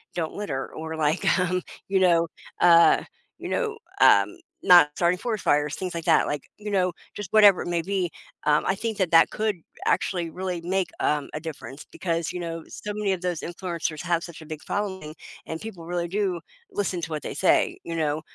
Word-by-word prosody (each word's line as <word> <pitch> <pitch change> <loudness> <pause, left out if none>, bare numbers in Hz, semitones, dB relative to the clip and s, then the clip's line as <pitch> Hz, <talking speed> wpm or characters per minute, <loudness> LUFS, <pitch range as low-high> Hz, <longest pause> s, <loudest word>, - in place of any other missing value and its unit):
"Don't 160 -2 -2
litter," 135 -11 -4
or, 160 0 -5
like, 155 +2 0
um, 180 0 0 0.3
you 195 - +3
know, 170 -2 +4 0.3
uh, 170 -1 +6 0.3
you - - -7
know, 445 -3 -1 0.2
um, - - +6 0.3
not 175 -5 +8
starting 175 +1 +2
forest 220 -3 -3
fires, 150 +1 +2
things 185 -1 -4
like 165 -1 -5
that, - - +4
like, 145 -2 -3
you 210 0 -6
know, 185 -2 +2 0.2
just 205 -4 -6
whatever 205 -3 +7
it - - -5
may 170 -1 0
be, 190 -2 -1 0.4
um, 150 0 +3
I - - +2
think 220 +1 -3
that 185 -4 0
that 165 -1 +7
could 215 -1 -1 0.3
actually 175 -3 0
really 180 -1 -4
make, 185 +2 -1
um, 150 -1 0
a - - -2
difference, 155 -2 -8
because, 165 -2 -2
you 180 - -4
know, 165 -1 -5
so 210 - -6
many 205 -2 0
of 185 - -4
those 180 -3 -2
influencers 170 -3 -4
have 170 -1 0
such 170 -2 -9
a 155 - -11
big 155 -1 -7
following, 190 -6 -4 0.3
and 160 0 -6
people 190 -7 -8
really 175 0 -2
do 190 -3 -1 0.3
listen 195 -3 -1
to 165 - -5
what 155 -1 -3
they - - -5
say, - - +3
you 170 - -5
know, 155 -1 0
175 Hz, 205 wpm, -25 LUFS, 160-190 Hz, 0.4 s, not